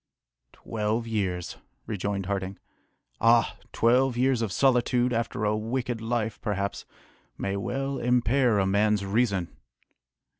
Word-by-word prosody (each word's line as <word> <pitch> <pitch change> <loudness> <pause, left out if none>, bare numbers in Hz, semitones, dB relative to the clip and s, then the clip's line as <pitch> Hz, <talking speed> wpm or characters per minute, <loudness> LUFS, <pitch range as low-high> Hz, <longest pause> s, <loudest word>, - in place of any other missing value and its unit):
"Twelve 110 +1 -2
years!" 95 -6 -2 0.3
rejoined 100 -2 -3
Harding. 95 0 -3 0.6
"Ah! 115 0 +4 0.2
twelve 125 +2 +3
years 130 -1 +2
of 110 -4 -1
solitude, 125 0 +2
after 115 -2 -1
a 105 0 +2
wicked 120 +2 -2
life, 115 -1 -2
perhaps, 100 -2 -2 0.5
may 100 0 -2
well 135 +7 -2
impair 125 -1 +2
a 95 - +2
man's 100 +1 +2
reason!" 100 -3 0
110 Hz, 115 wpm, -27 LUFS, 100-120 Hz, 0.6 s, Ah